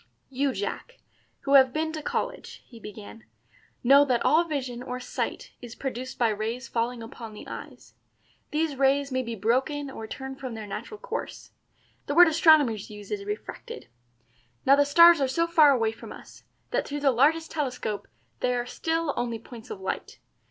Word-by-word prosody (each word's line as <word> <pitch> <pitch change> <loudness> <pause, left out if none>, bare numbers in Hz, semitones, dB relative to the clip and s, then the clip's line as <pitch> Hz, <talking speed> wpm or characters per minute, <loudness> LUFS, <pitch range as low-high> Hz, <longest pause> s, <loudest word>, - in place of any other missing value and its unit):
"You, 275 +1 0
Jack, 205 -4 -5 0.4
who 275 - -1
have 265 -2 +7
been 315 +3 -1
to 310 - -4
college," - - -4
he 235 - -14
began, 110 - -10 0.6
"know 275 +3 +7
that 250 -4 0
all 320 +3 +5
vision 260 -7 -4
or 250 0 -5
sight 250 - -4
is 240 -2 -9
produced 260 -1 -5
by 235 -3 +3
rays 220 +4 -3
falling 235 0 -2
upon 225 -1 -9
the - - -10
eyes. - - -10 0.6
These 300 -2 -1
rays 275 +1 +2
may 260 0 0
be 235 -2 -5
broken 265 +7 0
or 220 -4 -7
turned 265 +3 -7
from 255 -4 -6
their 220 -1 -6
natural 230 - -7
course - - -6 0.6
the 285 - -2
word 350 +1 +9
astronomers 310 - +4
use 210 -1 -11
is 400 -1 -3
refracted. 425 +2 -7 0.8
Now 275 - +7
the 285 0 +3
stars 335 +2 +7
are 270 - +2
so 335 +6 +1
far 325 -3 +6
away 230 -5 +2
from 225 - -11
us - - -13 0.3
that - - 0
through 290 0 -4
the 280 -2 +4
largest 305 +7 +2
telescope 250 -8 -3 0.3
they 250 0 +1
are 240 0 -1
still 325 +3 -2
only 240 -1 -2
points 230 +1 -12
of 195 - -6
light. 190 - -5
265 Hz, 180 wpm, -26 LUFS, 230-300 Hz, 0.8 s, word